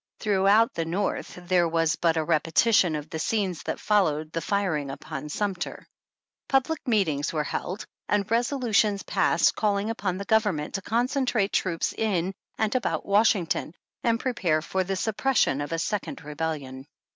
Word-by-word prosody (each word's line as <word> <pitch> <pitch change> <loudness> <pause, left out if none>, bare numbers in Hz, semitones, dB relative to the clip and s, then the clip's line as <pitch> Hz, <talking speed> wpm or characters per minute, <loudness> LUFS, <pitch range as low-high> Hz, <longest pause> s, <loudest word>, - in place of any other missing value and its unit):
Throughout 205 +2 +3
the 165 - -1
North 185 +5 -2
there 175 -2 +3
was 165 -2 +1
but 165 0 +1
a 160 - +1
repetition 165 +3 +3
of 150 +1 -6
the 160 - -4
scenes 190 -3 -1
that - - -4
followed 160 -7 +1
the 165 - -2
firing 180 -9 -1
upon 145 +1 -6
Sumter. 190 +2 -3 0.6
Public 275 +2 0
meetings 165 - +1
were 155 -2 -1
held, 185 +6 -4 0.2
and 205 -1 +2
resolutions 230 -4 +2
passed - - +2
calling 205 0 0
upon 190 -5 -2
the 200 - -5
Government 205 -9 +1
to 195 - -2
concentrate 240 -1 0
troops 170 -3 0
in 190 -4 -1 0.2
and 220 -1 0
about 255 - -1
Washington, 200 -5 +2 0.3
and 230 -1 +2
prepare 180 -13 0
for 190 +2 -1
the 195 +1 -2
sup 210 +3 -2
pression 230 - +2
of 145 - -5
a 165 - 0
second 195 0 -3
Rebellion. 145 -3 -4
190 Hz, 155 wpm, -26 LUFS, 160-215 Hz, 0.6 s, Throughout